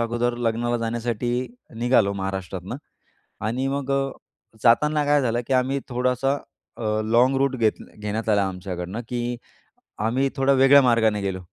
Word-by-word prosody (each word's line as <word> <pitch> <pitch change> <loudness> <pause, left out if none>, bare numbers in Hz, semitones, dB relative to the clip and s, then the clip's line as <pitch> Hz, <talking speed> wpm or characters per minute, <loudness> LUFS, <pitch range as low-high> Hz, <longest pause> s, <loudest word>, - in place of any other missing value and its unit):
अगोदर 120 +1 0
लग्नाला 120 +1 0
जाण्यासाठी 115 +1 -2 0.5
निघालो 115 -4 +3
महाराष्ट्रातनं. 95 +2 -4 0.7
आणि 130 +4 -1
मग 140 0 -2
अ, 135 0 0 0.5
जाताना 150 +5 +4
काय 145 0 +3
झालं 120 -2 0
की 135 - 0
आम्ही 130 +2 +1
थोडासा 125 +2 +1 0.4
अ, 110 -1 -1
लॉँग 120 +4 +3
रूट 135 -1 +1
घेत 110 -2 +1 0.2
घेण्यात 105 +2 -3
आला 100 -2 +3
आमच्याकडनं. 90 +2 -5
की 120 0 -3 0.6
आम्ही 125 +5 +1
थोडं 135 0 +3
वेगळ्या 135 +2 +7
मार्गाने 110 -4 +2
गेलो, 95 -1 -2
120 Hz, 140 wpm, -24 LUFS, 110-130 Hz, 0.7 s, वेगळ्या